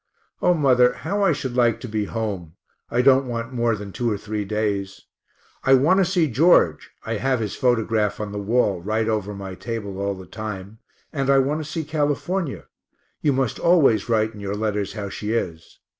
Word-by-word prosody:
O 180 Hz, -, +4 dB
mother, 125 Hz, -5 st, +4 dB
how 200 Hz, +7 st, -3 dB
I 195 Hz, -3 st, +4 dB
should 135 Hz, -4 st, -3 dB
like 120 Hz, -2 st, +3 dB
to -, -, -6 dB
be 105 Hz, -2 st, -2 dB
home 100 Hz, -7 st, -4 dB, 0.3 s
(I 125 Hz, +1 st, +1 dB
don't 135 Hz, 0 st, +5 dB
want 115 Hz, +1 st, -4 dB
more 120 Hz, -2 st, +1 dB
than 105 Hz, -1 st, -8 dB
two 120 Hz, +4 st, -1 dB
or 105 Hz, -, -1 dB
three 105 Hz, 0 st, -4 dB
days). 100 Hz, -2 st, -2 dB, 0.6 s
I 135 Hz, -, +6 dB
want 155 Hz, +9 st, +4 dB
to 190 Hz, -, +4 dB
see 175 Hz, -2 st, +2 dB
George 125 Hz, -, +3 dB, 0.2 s
(I 115 Hz, 0 st, -2 dB
have 130 Hz, +2 st, 0 dB
his 105 Hz, -3 st, -3 dB
photograph 115 Hz, -4 st, +1 dB
on 105 Hz, -1 st, -4 dB
the 105 Hz, -, -4 dB
wall, 100 Hz, -3 st, +1 dB
right 110 Hz, +4 st, -1 dB
over 105 Hz, -2 st, -1 dB
my 95 Hz, -1 st, -7 dB
table 100 Hz, -2 st, -5 dB
all 100 Hz, 0 st, -1 dB
the 95 Hz, 0 st, -10 dB
time), 105 Hz, +1 st, -7 dB, 0.3 s
and 135 Hz, -2 st, -1 dB
I 140 Hz, -, +6 dB
want 140 Hz, +3 st, +1 dB
to 150 Hz, -, -9 dB
see 165 Hz, -1 st, -2 dB
California 155 Hz, +2 st, -2 dB, 0.6 s
you 150 Hz, -, +3 dB
must 130 Hz, -3 st, -1 dB
always 150 Hz, -10 st, +4 dB
write 110 Hz, -1 st, +1 dB
in 105 Hz, -, -11 dB
your 100 Hz, 0 st, -3 dB
letters 105 Hz, -2 st, -2 dB
how 100 Hz, -2 st, -5 dB
she 105 Hz, +3 st, -4 dB
is. 85 Hz, -8 st, -4 dB
115 Hz, 200 wpm, -23 LUFS, 105-135 Hz, 0.6 s, I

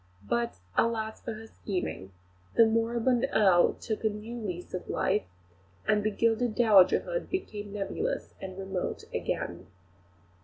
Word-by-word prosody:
Alas, 220 Hz, -1 st, +1 dB
for 230 Hz, -, -4 dB
her 220 Hz, +1 st, -9 dB
scheming; 180 Hz, -, -4 dB, 0.4 s
the 230 Hz, -, +8 dB
moribund 235 Hz, +3 st, +2 dB
Earl 190 Hz, -5 st, +5 dB
took 220 Hz, -1 st, -4 dB
a 220 Hz, -, +4 dB
new 215 Hz, +3 st, -6 dB
lease 185 Hz, -7 st, -5 dB
of 180 Hz, -, -5 dB
life, 205 Hz, +2 st, +1 dB, 0.6 s
and 210 Hz, -1 st, +3 dB
the 215 Hz, -, +2 dB
gilded 225 Hz, +2 st, +1 dB
dowagerhood 230 Hz, -, +4 dB
became 210 Hz, -, -4 dB
nebulous 210 Hz, -, -3 dB
and 185 Hz, -1 st, -6 dB
remote 190 Hz, -1 st, -3 dB
again. -, -, -3 dB
215 Hz, 125 wpm, -29 LUFS, 195-230 Hz, 0.6 s, the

